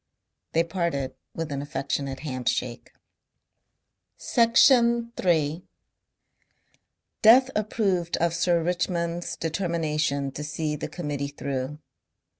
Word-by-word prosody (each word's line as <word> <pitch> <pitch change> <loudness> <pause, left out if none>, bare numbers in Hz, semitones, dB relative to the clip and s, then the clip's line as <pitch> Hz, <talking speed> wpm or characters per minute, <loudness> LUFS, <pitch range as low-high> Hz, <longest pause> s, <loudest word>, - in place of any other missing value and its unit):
They 165 - +3
parted 170 -6 -2 0.2
with 165 -2 -4
an 140 -1 -2
affectionate 140 -1 -3
handshake. 125 -3 -3 1.3
Section 235 0 +4
3 160 -2 +1 1.6
Death 255 +4 +7
approved 195 -5 0
of 170 0 +1
Sir 170 0 +2
Richmond's 175 0 -1
determination 155 -5 -1
to 150 - -6
see 150 +1 -2
the - - -5
Committee 145 -5 -3
through. 140 0 -4
165 Hz, 90 wpm, -26 LUFS, 145-180 Hz, 1.6 s, Death